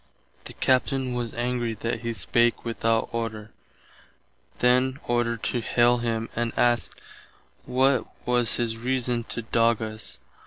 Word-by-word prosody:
The - - -8
Captain 130 0 +1
was 120 -2 -2
angry 120 -1 -1
that 115 +2 -3
he 115 +1 -3
spake 120 +5 +1
without 115 -1 0
order, 110 -2 -4 1.1
then 130 +2 +3
ordered 120 -1 0
to 120 - 0
haile 120 +1 +3
him 115 -1 -1
and 120 0 -1
askt 120 -1 +1 0.7
what 130 0 +2 0.2
was 120 -1 +2
his 115 -2 -1
reason 125 -1 0
to 115 - -3
dogg 115 0 +2
us. 110 - -5
120 Hz, 130 wpm, -26 LUFS, 115-125 Hz, 1.1 s, then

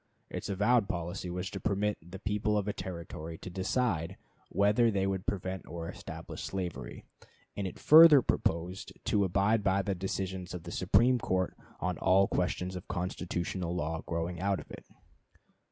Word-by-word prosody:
Its - - -5
avowed 105 +2 +3
policy 90 -1 -3
was 90 +2 -4
to 100 - -5
permit 105 +1 0
the 90 +4 -10
people 105 +1 0
of 105 0 -1
a 105 - 0
Territory 85 -3 -6
to 90 - -8
decide 95 -2 -1 0.3
whether 105 +4 +3
they 100 -3 +1
would 95 -1 -2
prevent 95 -1 -3
or 85 0 -6
establish - - -8
slavery, 85 -10 -5 0.5
and 100 -2 -2
it - - -7
further 155 -3 +9
proposed 85 +3 -1
to 100 - +2
abide 100 +4 +2
by 100 0 +2
the 100 0 -1
decisions 95 -1 -4
of 85 - -7
the - - -7
Supreme 125 +1 +3
Court 95 -4 -1 0.2
on - - -2
all 95 +1 +4
questions 90 +1 -1
of 90 - -7
constitutional 90 -1 -3
law 80 -1 -2
growing 85 +1 -3
out 100 0 +1
of - - -12
it. - - -10
95 Hz, 165 wpm, -31 LUFS, 90-100 Hz, 0.5 s, further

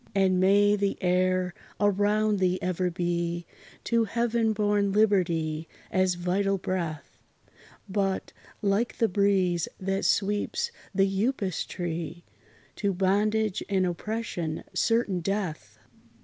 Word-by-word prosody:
And 190 -2 +3
may 205 +2 +5
the 200 -1 -1
air 185 0 +1 0.3
around 205 +1 +2
thee 185 -1 +2
ever 180 0 -1
be 175 0 -2 0.4
To 230 -1 +2
heaven 235 0 +1
born 205 -1 +1
Liberty 170 -7 +1 0.2
as 185 -1 +2
vital 195 +3 0
breath; 170 -6 -4 0.7
But, 195 -1 -1 0.3
like 205 +4 +1
the 230 - +3
breeze 185 -3 +2
that 195 +1 -1
sweeps 210 - 0 0.2
the 195 0 +4 0.2
Upas 210 -8 -1
tree, 170 0 -4 0.5
To 200 -2 0
Bondage 205 +2 +1
and 190 -2 +2
Oppression 175 -3 -3
certain 225 -5 +1
death! 165 - -3
195 Hz, 110 wpm, -27 LUFS, 180-205 Hz, 0.7 s, may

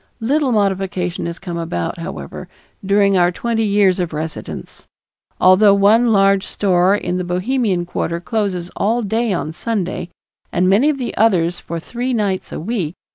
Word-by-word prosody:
Little 270 +4 +1
modification 190 -4 -1
has 170 0 -5
come 175 -3 -5
about, 160 - -3
however, 165 - -7 0.4
during 200 0 +3
our 175 -1 +4
twenty 230 +4 -2
years 200 -3 +3
of 175 -3 -2
residence, 155 +1 -7 0.5
although 195 +2 +6
one 215 +4 +4
large 195 -3 +3
store 185 -1 +2
in 180 -3 -2
the 180 - -2
Bohemian 185 +1 0
quarter 170 -1 -3
closes 185 -3 -2
all 230 +4 0
day 225 +2 0
on 160 -4 -2
Sunday 185 -3 -3 0.4
and 180 +1 +1
many 210 +10 +4
of 300 - 0
the 250 -3 -4
others 180 -6 +2
for 170 0 -5
three 245 +8 -3
nights 200 -4 -1
a - - -5
week. 180 -3 -3
195 Hz, 160 wpm, -18 LUFS, 175-220 Hz, 0.5 s, although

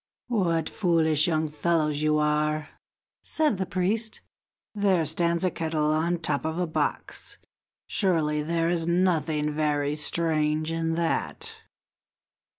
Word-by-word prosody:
"What 170 -8 +1
foolish 160 -5 +2
young 160 -2 +1
fellows 150 -1 0
you 155 0 +2
are!" 150 0 0 0.5
said 300 -11 0
the 190 - -1
priest. 215 +5 -1 0.5
"There 195 -5 +2
stands 170 +2 0
a 180 - +1
kettle 155 -2 0
on 165 +3 +1
the - - 0
top 150 -4 -1
of 160 +1 -2
a 180 - +1
box; 160 - -3 0.5
surely 160 -6 +1
there 165 +2 0
is 170 -1 0
nothing 165 -4 +1
very 150 -1 0
strange 155 0 0
in 165 0 -1
that. 165 -1 -2
160 Hz, 130 wpm, -26 LUFS, 150-175 Hz, 0.5 s, foolish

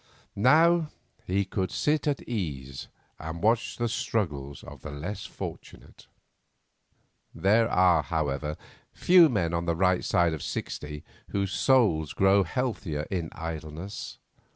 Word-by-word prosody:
Now 160 +7 +4 0.4
he 95 +2 +1
could 95 -1 -2
sit 150 +1 0
at 145 -2 -1
ease 70 - -4 0.3
and 80 +2 -6
watch 115 +2 +1
the 120 - 0
struggles 75 - -3
of 75 -3 -12
others 70 -2 -7
less 100 +7 -5
fortunate. - - -9 1.3
There 110 +4 +3
are, 90 -3 +4
however, 75 0 -2 0.3
few 175 -3 +6
men 90 -9 0
on 85 0 -1
the 85 -1 0
right 90 +1 +2
side 85 -2 +2
of 75 - -5
sixty 75 0 -5 0.3
whose 100 -1 -1
souls 105 - +2
grow 95 +1 +4
healthier 95 - -2
in 85 -4 -2
idleness. 80 +4 -6
90 Hz, 130 wpm, -27 LUFS, 80-110 Hz, 1.3 s, few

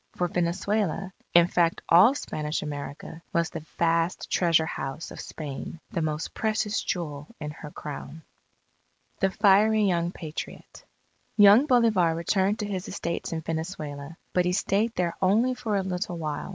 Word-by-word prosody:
For 180 - 0
Venezuela 190 +2 -1 0.2
in 170 0 +8
fact 170 -1 +1
all 195 +11 +7
Spanish 150 - -3
America 145 +2 -7
was 170 -1 +1
the 165 - -6
vast 165 +1 +1
treasure 165 -3 +3
house 135 0 -5
of - - -9
Spain, 150 +1 -7
the 170 - -1
most 155 0 -2
precious 215 -1 0
jewel 150 -5 -4
in 150 -1 -5
her 150 0 -9
Crown. 150 +1 -8 1.0
THE 195 - +3
FIERY 210 +2 +4
YOUNG 175 -3 +1
PATRIOT 155 -1 -8 0.5
Young 205 +7 +7
Bolivar 220 - +3
returned 190 +5 +1
to - - -2
his 190 -3 -4
estates 170 -3 -4
in 165 -1 -3
Venezuela. 160 -2 -5 0.2
But 180 -1 +2
he 180 - +1
stayed 215 +4 +1
there 175 -2 0
only 220 +7 +3
for 235 -4 -2
a 195 - +1
little 180 -1 -3
while. 155 -3 -4
175 Hz, 150 wpm, -26 LUFS, 160-200 Hz, 1.0 s, in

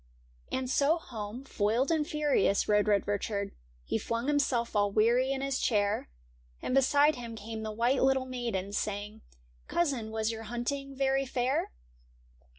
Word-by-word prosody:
And 260 0 -1
so 285 +5 +3
home, 230 -4 -7
foiled 235 +3 0
and 310 -2 +1
furious, 295 - +2
rode 210 0 +3
Red 205 -2 +2
Richard; 205 0 -2 0.3
He 110 - -1
flung 230 +1 -2
himself 265 -6 +1
all 205 -1 +3
weary 235 +5 +3
in 270 0 -1
his 275 -1 -1
chair. 205 - +1 0.5
And - - -3
beside 285 +2 +4
him 235 -2 -6
came 220 +1 -6
the 215 0 -4
white 240 +5 +1
little 265 0 +3
maiden. 235 -7 -3
Saying, 210 +1 -3 0.4
*■ - - -33
Cousin, 275 -10 0
was 220 0 -1
your 225 0 -6
hunting 270 +4 -3
very 270 0 +1
fair 250 +1 0
240 Hz, 155 wpm, -30 LUFS, 215-270 Hz, 0.5 s, beside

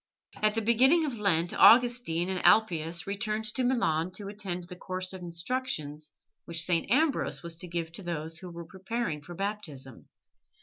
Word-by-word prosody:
At 215 0 +2
the 225 - 0
beginning 260 +9 +4
of 250 -7 -4
Lent 175 -4 +2
Augustine 240 -8 +5
and 185 -1 -2
Alypius 170 -6 +3
returned 215 +2 -2
to 260 - 0
Milan 185 -10 +1
to 200 +1 -6
attend 195 -4 -4
the 180 +1 -10
course 185 +1 -5
of 190 - -8
instructions 170 - -3 0.3
which 165 -1 -1
St. 170 -1 0
Ambrose 290 - +1
was 170 -1 -4
to 180 - -4
give 165 -1 -4
to 165 - -8
those 165 -2 -5
who 185 - -9
were 170 0 -8
preparing 190 -2 -4
for 175 +4 -10
Baptism. 165 - -5
185 Hz, 170 wpm, -29 LUFS, 165-220 Hz, 0.3 s, Augustine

